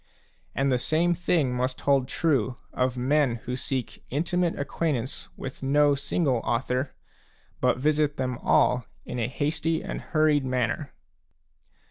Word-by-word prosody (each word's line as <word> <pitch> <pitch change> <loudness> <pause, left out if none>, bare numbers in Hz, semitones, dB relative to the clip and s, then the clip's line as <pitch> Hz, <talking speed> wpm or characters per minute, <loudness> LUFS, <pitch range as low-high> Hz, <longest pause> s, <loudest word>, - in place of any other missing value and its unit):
And 135 0 +2
the 125 - +2
same 165 +7 +2
thing 165 -6 +1
must 130 +1 -2
hold 140 -2 +3
true 130 -7 +1 0.2
of 125 0 0
men 135 0 +2
who 125 - -2
seek 130 -1 -4
intimate 170 +4 0
acquaint 145 +1 0
ance 120 +3 -6
with 135 - -7
no 145 +2 +4
single 140 -1 0
author, 125 +4 -1 0.6
but - - +2
visit 150 +1 +1
them 125 -2 -2
all 125 -1 +3 0.2
in 125 - -4
a 115 - +1
hasty 155 +4 -1
and - - -4
hurried 155 -3 +2
manner. 130 +2 -1
135 Hz, 140 wpm, -26 LUFS, 125-150 Hz, 0.6 s, no